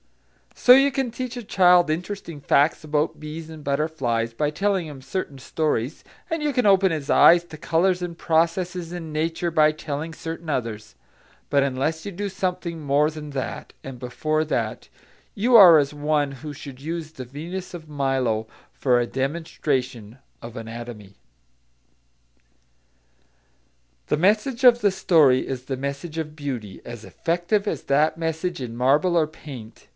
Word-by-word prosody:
So, 250 - +7
you 275 +2 +5
can 265 -2 -1
teach 250 +1 -5
a 240 - -5
child 180 -4 +4
interesting 170 -1 -4
facts 145 +3 +2
about 150 +1 -1
bees 155 +1 -7
and 160 -2 -10
butterflies 140 -6 -1
by 145 +5 0
telling 195 +1 0
him 145 -4 -9
certain 145 -1 -4
stories, 145 -2 -2 0.3
and 325 -2 -2
you 295 -1 0
can 250 -2 +1
open 195 -2 +5
his 150 -4 -4
eyes 175 0 +7
to 160 - -11
colours 175 +3 +1
and 175 -1 -5
processes 170 +1 0
in 165 -3 -6
nature 165 +3 -1
by 155 -2 +4
telling 155 +1 -5
certain 165 0 -7
others; 110 -6 -3 0.5
but 140 0 +3
unless 140 +4 -2
you 200 - -4
do 200 +2 -4
something 180 -3 -3
more 145 +1 +2
than 155 -1 -8
that 135 -2 -5
and 135 -1 -8
before 155 +6 -1
that, 155 - -3 0.4
you 235 +3 +2
are 180 -7 +10
as 140 0 -1
one 145 -1 0
who 145 +3 -8
should 140 -2 -10
use 160 +1 -5
the 130 -5 -8
Venus 170 +9 -7
of 160 -3 -9
Milo 135 -6 0 0.3
for 125 -3 +2
a 120 - 0
demonstration 135 -5 -3 0.3
in 115 0 -8
anatomy. 115 -3 -8 2.9
The - - +1
message 215 - +1
of 240 -1 +7
the 205 - +3
story 155 -9 +3
is 130 -1 -5
the 130 0 -3
message 140 +4 -5
of 155 -1 -4
beauty, 130 -9 -6
as 120 -2 -8
effective 175 +5 -1
as - - -2
that 150 +3 +2
message 165 0 -3
in 120 -2 -5
marble 145 +9 +2
or 165 -2 +4
paint. 135 -7 -11
155 Hz, 160 wpm, -23 LUFS, 135-175 Hz, 2.9 s, are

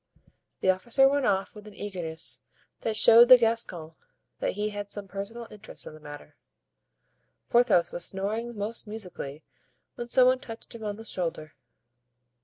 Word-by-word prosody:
The 190 - +5
officer 235 +8 +3
went 280 -1 +1
off 195 -1 0
with 210 0 -12
an 210 - -12
eagerness 175 -6 -4 0.4
that 220 - -2
showed 230 +2 +7
the 255 - +11
Gascon 225 -9 -1 0.5
that - - -1
he 210 +2 -2
had 205 -1 -6
some 200 -1 -8
personal 205 +5 -7
interest 210 0 -10
in - - -9
the 155 - -13
matter. 145 -1 -12 1.1
Porthos 235 -8 +4
was 175 - -4
snoring 215 +4 -3
most 215 +2 -1
musically 180 -9 -7 0.5
when 240 - -6
some 250 +1 +5
one 255 0 +4
touched 225 -1 -10
him 230 -1 -9
on 205 -1 -3
the 225 +1 -11
shoulder. 165 -6 -3
210 Hz, 160 wpm, -27 LUFS, 185-230 Hz, 1.1 s, the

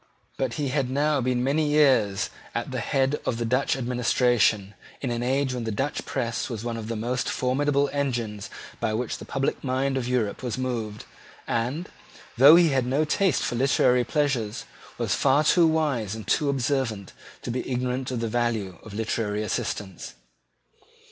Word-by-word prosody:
But 130 -3 -2
he 145 -3 -1
had 135 -2 0
now 145 +1 +1
been 125 0 0
many 150 +3 +1
years 130 -10 +3 0.2
at - - -3
the - - -2
head 135 +2 0
of 115 - -1
the 120 - -2
Dutch 125 +4 +1
administration, 120 -4 +2 0.3
in 130 - -3
an 120 0 -2
age 130 +1 0
when 125 -2 -3
the 110 - -2
Dutch 135 +8 -2
press 120 -3 -2
was 115 -3 -5
one 120 -1 -3
of 110 -1 -6
the 115 - -3
most 120 +4 -2
formidable 140 +2 +1
engines 120 -8 -2 0.3
by 110 -2 0
which 120 +1 -3
the - - -9
public 135 0 -2
mind 135 +1 0
of 125 -2 -2
Europe 120 -5 -1
was 125 -2 -3
moved, 115 -5 -3 0.4
and, 130 +10 -2 0.5
though 140 +6 +9
he 170 -1 +6
had 130 -3 +1
no 140 +5 +2
taste 185 0 +1
for - - -1
literary 125 0 +3
pleasures, 125 -6 -1 0.3
was - - 0
far 140 +2 +3
too 170 +2 +5
wise 140 -10 0
and 110 - -8
too 145 - +1
observant 130 -7 -1 0.3
to - - -3
be 125 +2 -3
ignorant 125 0 -1
of 125 -3 -3
the 115 - -1
value 110 -5 -1
of 105 -2 -10
literary 110 -1 -1
assistance. 95 -6 -4
125 Hz, 175 wpm, -25 LUFS, 115-140 Hz, 0.5 s, though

